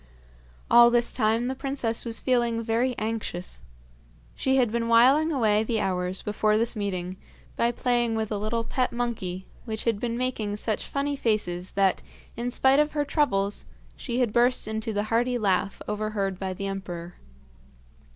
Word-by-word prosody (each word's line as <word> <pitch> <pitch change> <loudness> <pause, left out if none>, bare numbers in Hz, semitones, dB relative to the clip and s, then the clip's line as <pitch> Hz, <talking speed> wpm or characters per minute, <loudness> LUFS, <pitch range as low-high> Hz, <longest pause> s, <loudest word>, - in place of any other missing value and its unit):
All 240 0 +8
this 240 0 +2
time 225 0 +1
the 260 - -1
princess 265 -4 -2
was 230 -1 -4
feeling 235 -3 +1
very 240 +3 0
anxious. 215 -5 -4 0.7
She 265 0 0
had 250 -4 +3
been 230 0 -1
whiling 265 +8 +5
away 215 -7 +3
the 220 0 -1
hours 185 -2 -1
before 210 0 +1
this 230 +2 0
meeting 185 -3 -3 0.4
by 235 +1 +2
playing 240 -1 0
with 220 -1 -2
a 205 - -1
little 225 +2 -1
pet 250 +2 -1
monkey, 205 -7 -3 0.2
which 220 -2 -3
had 225 -3 0
been 235 0 -2
making 235 -5 -2
such 215 +1 -2
funny 285 +1 -1
faces 195 -8 -1
that, 195 -1 +2 0.3
in 240 +1 -2
spite 265 +2 +4
of 300 0 +2
her 295 -1 0
troubles, 205 -10 0 0.3
she 245 0 -2
had 235 -4 +1
burst 240 -1 +3
into 220 +1 -2
the 205 -1 -1
hearty 245 +2 +2
laugh 195 -2 0
overheard 210 -3 -2
by 190 -1 -3
the 195 - -5
emperor. 180 -3 -6
225 Hz, 165 wpm, -26 LUFS, 205-245 Hz, 0.7 s, All